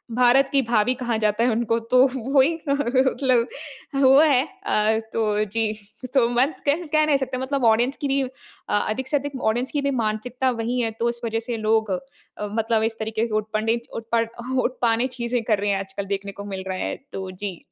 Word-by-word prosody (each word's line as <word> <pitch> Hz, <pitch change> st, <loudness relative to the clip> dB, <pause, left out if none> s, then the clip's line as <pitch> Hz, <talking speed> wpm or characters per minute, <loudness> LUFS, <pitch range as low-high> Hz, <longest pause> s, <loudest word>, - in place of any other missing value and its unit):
भारत 250 Hz, +2 st, +4 dB
की 275 Hz, -, +3 dB
भाभी 235 Hz, 0 st, +2 dB
कहा 240 Hz, -2 st, -2 dB
जाता 215 Hz, +1 st, +1 dB
है 245 Hz, -, +3 dB
उनको 230 Hz, 0 st, +1 dB, 0.2 s
तो -, -, +7 dB, 0.2 s
वो 265 Hz, +2 st, +2 dB
ही 310 Hz, +6 st, +3 dB, 0.2 s
मतलब 260 Hz, -2 st, +2 dB, 0.5 s
वो 270 Hz, +1 st, +7 dB
है 280 Hz, -5 st, +4 dB, 0.2 s
अ, 215 Hz, -, +2 dB, 0.2 s
तो 215 Hz, -2 st, +1 dB
जी 220 Hz, -1 st, +1 dB, 0.3 s
सो 255 Hz, -1 st, +2 dB
मच 260 Hz, +6 st, +1 dB
कह 310 Hz, 0 st, +2 dB
नहीं 295 Hz, -2 st, +3 dB
सकते 265 Hz, -1 st, -3 dB
मतलब 265 Hz, 0 st, -1 dB
ऑडियंस 235 Hz, +4 st, +3 dB
की 285 Hz, -, -2 dB
भी 275 Hz, 0 st, +1 dB
अ, 260 Hz, -, -4 dB, 0.6 s
अधिक 260 Hz, +5 st, -2 dB
से 290 Hz, -, +2 dB
अधिक 280 Hz, -1 st, -5 dB
ऑडियंस 240 Hz, +4 st, 0 dB
की 290 Hz, -, -1 dB
भी 280 Hz, 0 st, 0 dB
मानसिकता 245 Hz, +2 st, -1 dB
वही 240 Hz, +1 st, -2 dB
है, 225 Hz, -1 st, 0 dB
तो 230 Hz, +2 st, -1 dB
इस 235 Hz, 0 st, -5 dB
वज़ह 225 Hz, 0 st, -1 dB
से 230 Hz, 0 st, -4 dB
लोग 220 Hz, -1 st, +1 dB
अ, 185 Hz, -, 0 dB, 0.5 s
मतलब 225 Hz, 0 st, +1 dB
इस 225 Hz, 0 st, -1 dB
तरीके 220 Hz, +1 st, -1 dB
के 220 Hz, -, -7 dB
उटपंडित 220 Hz, +2 st, -1 dB
उत्पड 230 Hz, 0 st, -1 dB, 0.3 s
उटपानी 240 Hz, -1 st, +1 dB
चीज़े 240 Hz, 0 st, -1 dB
कर 210 Hz, -, +3 dB
रहे 205 Hz, +1 st, -1 dB
हैं 195 Hz, -, 0 dB
आजकल 195 Hz, +1 st, -5 dB
देखने 200 Hz, +1 st, -7 dB
को 200 Hz, +1 st, -9 dB
मिल 195 Hz, -2 st, -5 dB
रहा 190 Hz, -1 st, -3 dB
है, -, -, -2 dB, 0.2 s
तो 190 Hz, -1 st, -5 dB
जी। 185 Hz, -1 st, -6 dB
235 Hz, 205 wpm, -23 LUFS, 220-260 Hz, 0.6 s, तो